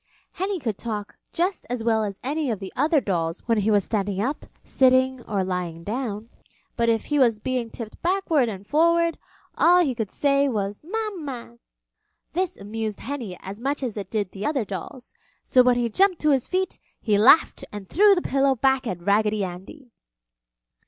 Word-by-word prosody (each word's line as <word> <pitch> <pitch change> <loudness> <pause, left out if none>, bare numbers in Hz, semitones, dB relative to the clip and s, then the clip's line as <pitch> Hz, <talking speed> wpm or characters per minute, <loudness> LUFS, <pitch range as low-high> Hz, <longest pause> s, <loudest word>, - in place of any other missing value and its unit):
Henny 380 +1 -2
could 225 -8 -3
talk 210 -3 -5 0.2
just 360 +3 -1
as 245 -2 -3
well 225 -1 +2
as 200 -2 -5
any 290 +2 -1
of 220 -4 -2
the 195 -2 -8
other 300 +3 +3
dolls 170 -7 -2
when 230 -2 +2
he 210 +2 +1
was 205 -2 +3
standing 200 -2 -2
up, 265 +8 -2 0.2
sitting, 260 -1 +3
or 200 -3 -1
lying 180 -3 -4
down, 220 0 -4 0.5
but 235 0 +1
if 225 -1 +1
he 295 -1 0
was 235 -5 +4
being 245 +1 -2
tipped 225 -1 -8
forward 340 -8 +1
and 200 -2 -7
backward, 335 +2 +2 0.4
all 355 +1 +6
he 275 -6 0
could 220 -4 -3
say 280 +2 +2
was, 205 -3 -3
"Mama." 315 - -5 0.7
This 365 0 -1
amused 215 +1 -5
Henny 235 -9 -5
as 200 +3 -8
much 275 +2 -1
as 240 -5 -3
it 200 -3 -6
did 205 -4 -2
the 195 - -7
other 270 -3 0
dolls, 200 +6 -8 0.3
so 255 - +5
when 250 -1 +4
he 240 -1 +1
jumped 370 - +2
to 305 - +3
his 265 -3 +1
feet 375 0 -1 0.2
he 210 -3 +1
laughed 255 +9 +5
and 205 -2 -8
threw 405 - +5
the 355 - -2
pillow 270 0 +2
back 265 +1 +1
at 175 -4 -4
Raggedy 210 +1 +2
Andy. 195 - -8
240 Hz, 185 wpm, -24 LUFS, 205-290 Hz, 0.7 s, all